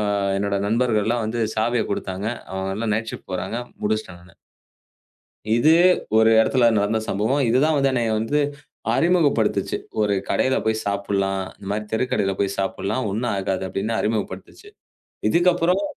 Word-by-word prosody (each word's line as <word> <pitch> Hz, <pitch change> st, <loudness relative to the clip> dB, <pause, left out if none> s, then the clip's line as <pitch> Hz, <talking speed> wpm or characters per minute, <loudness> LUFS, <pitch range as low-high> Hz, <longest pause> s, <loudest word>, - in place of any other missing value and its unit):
ஆ, -, -, 0 dB, 0.3 s
என்னோட 100 Hz, 0 st, 0 dB
நண்பர்கள் 110 Hz, -1 st, +1 dB
எல்லாம் 115 Hz, -1 st, 0 dB
வந்து 115 Hz, +2 st, -2 dB
சாவிய 115 Hz, +1 st, +1 dB
கொடுத்தாங்க. 95 Hz, 0 st, -3 dB, 0.3 s
அவுங்க 95 Hz, 0 st, -3 dB
எல்லாம் 110 Hz, 0 st, -1 dB
நைட் 110 Hz, +1 st, -2 dB
ஷிப்ட் -, -, -10 dB
போறாங்க. 90 Hz, +5 st, -3 dB, 0.2 s
முடிச்சிட்டேன் 105 Hz, -4 st, -2 dB
நானு. 85 Hz, -1 st, -19 dB, 1.2 s
இதுவே 160 Hz, +8 st, +5 dB, 0.4 s
ஒரு 110 Hz, 0 st, +5 dB
இடத்துல 120 Hz, 0 st, +3 dB
நடந்த 105 Hz, +2 st, +1 dB
சம்பவம். 120 Hz, +8 st, +1 dB
இது 120 Hz, -, +3 dB
தான் 155 Hz, -, +2 dB
வந்து 135 Hz, 0 st, +3 dB
என்னைய 120 Hz, -3 st, 0 dB
வந்து 130 Hz, +7 st, 0 dB, 0.6 s
அறிமுகப்படுத்துச்சு. 160 Hz, -11 st, +2 dB, 0.2 s
ஒரு 105 Hz, -1 st, +2 dB, 0.2 s
கடையில 130 Hz, 0 st, +2 dB
போய்ச் 110 Hz, 0 st, 0 dB
சாப்பிடலாம். 100 Hz, -1 st, -1 dB, 0.2 s
இந்த 100 Hz, -, -11 dB
மாதிரி 105 Hz, +1 st, -2 dB
தெருக்கடையில 105 Hz, -4 st, 0 dB
போய்ச் 100 Hz, 0 st, -1 dB
சாப்பிடலாம். 100 Hz, +5 st, -2 dB
ஒண்ணும் 110 Hz, +2 st, -1 dB
ஆகாது 95 Hz, -1 st, -2 dB
அப்படின்னு 100 Hz, +5 st, -2 dB
அறிமுகப்படுத்தச்சு. 105 Hz, -, -4 dB, 0.6 s
இதுக்கப்புறம். 175 Hz, +1 st, +2 dB
110 Hz, 145 wpm, -22 LUFS, 100-125 Hz, 1.2 s, இதுவே